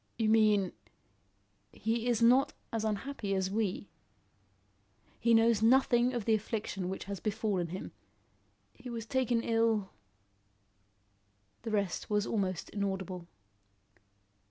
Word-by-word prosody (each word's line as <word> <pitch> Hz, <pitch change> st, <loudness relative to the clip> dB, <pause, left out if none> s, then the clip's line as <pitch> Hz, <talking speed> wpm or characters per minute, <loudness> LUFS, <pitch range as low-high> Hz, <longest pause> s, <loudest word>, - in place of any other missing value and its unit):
"You 220 Hz, -2 st, +1 dB
mean 215 Hz, -4 st, +4 dB, 0.5 s
" 100 Hz, +1 st, -42 dB, 0.2 s
"He 225 Hz, +2 st, -1 dB
is 235 Hz, -1 st, +2 dB
not 255 Hz, +4 st, +5 dB, 0.2 s
as 225 Hz, -1 st, -1 dB
unhappy 215 Hz, -1 st, -2 dB
as 190 Hz, 0 st, -1 dB
we. 205 Hz, -2 st, -2 dB, 1.3 s
He 235 Hz, -1 st, +4 dB
knows 225 Hz, -1 st, +4 dB
nothing 245 Hz, +1 st, +4 dB
of 235 Hz, -4 st, -3 dB
the 225 Hz, -, +3 dB
affliction 210 Hz, -3 st, -2 dB
which 190 Hz, -, -4 dB
has 200 Hz, -1 st, -6 dB
befallen 210 Hz, -4 st, -1 dB
him. 185 Hz, +3 st, -6 dB, 0.8 s
He 245 Hz, 0 st, -10 dB
was 230 Hz, -2 st, -5 dB
taken 245 Hz, -2 st, 0 dB
ill 225 Hz, -3 st, +1 dB, 1.2 s
" 100 Hz, 0 st, -42 dB
The -, -, -5 dB
rest 200 Hz, -4 st, -1 dB
was 210 Hz, 0 st, +1 dB
almost 190 Hz, -5 st, -2 dB
inaudible. 190 Hz, -3 st, -3 dB
215 Hz, 125 wpm, -31 LUFS, 190-230 Hz, 1.3 s, not